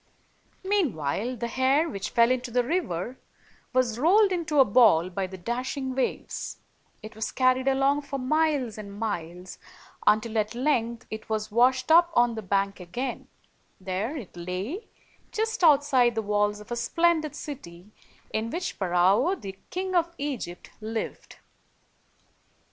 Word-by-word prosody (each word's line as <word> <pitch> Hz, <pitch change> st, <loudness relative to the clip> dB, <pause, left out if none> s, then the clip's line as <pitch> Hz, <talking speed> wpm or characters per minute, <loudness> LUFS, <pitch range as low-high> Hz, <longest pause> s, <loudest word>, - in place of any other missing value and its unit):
Meanwhile, 250 Hz, -, 0 dB
the 235 Hz, 0 st, -3 dB
hair, 265 Hz, +6 st, +2 dB
which 200 Hz, -11 st, -4 dB
fell 235 Hz, +1 st, +4 dB
into 255 Hz, -1 st, -1 dB
the 245 Hz, +1 st, +1 dB
river, 250 Hz, -, -2 dB, 0.5 s
was 245 Hz, -3 st, +1 dB
rolled 390 Hz, -, +5 dB
into 325 Hz, -5 st, 0 dB
a 270 Hz, -, +8 dB
ball 200 Hz, -7 st, +5 dB
by 190 Hz, +1 st, -2 dB
the 190 Hz, 0 st, -9 dB
dashing 255 Hz, +6 st, -3 dB
waves; 260 Hz, 0 st, -3 dB, 0.5 s
it 215 Hz, 0 st, -9 dB
was 220 Hz, -, -3 dB
carried 255 Hz, 0 st, +2 dB
along 270 Hz, +2 st, +3 dB
for 280 Hz, -1 st, -5 dB
miles 270 Hz, -4 st, 0 dB
and 200 Hz, -1 st, -9 dB
miles, 180 Hz, -4 st, -5 dB, 0.5 s
until, 220 Hz, +1 st, +3 dB
at 215 Hz, +2 st, -2 dB
length, 240 Hz, -3 st, 0 dB
it 220 Hz, 0 st, -7 dB
was 215 Hz, -1 st, -2 dB
washed 255 Hz, +5 st, +3 dB
up 340 Hz, +1 st, +7 dB
on 240 Hz, -1 st, +4 dB
the 220 Hz, -, -5 dB
bank 195 Hz, 0 st, 0 dB
again; 240 Hz, +9 st, -5 dB, 0.5 s
there 195 Hz, +10 st, -3 dB
it 220 Hz, -11 st, -9 dB
lay, 185 Hz, -, -5 dB, 0.4 s
just 445 Hz, -2 st, -2 dB
outside 275 Hz, -6 st, +5 dB
the 220 Hz, -, -1 dB
walls 205 Hz, 0 st, +1 dB
of 210 Hz, -, -13 dB
a -, -, 0 dB
splen 330 Hz, +7 st, +2 dB
did 305 Hz, -2 st, -6 dB
city 195 Hz, -, -9 dB, 0.4 s
in 220 Hz, +1 st, -1 dB
which 355 Hz, +8 st, -3 dB
Pharaoh, 190 Hz, -, +2 dB
the 195 Hz, -, -9 dB
King 370 Hz, +1 st, -3 dB
of 340 Hz, -1 st, +1 dB
Egypt, 260 Hz, -12 st, -5 dB
lived. 220 Hz, +1 st, -5 dB
240 Hz, 150 wpm, -26 LUFS, 205-285 Hz, 0.5 s, a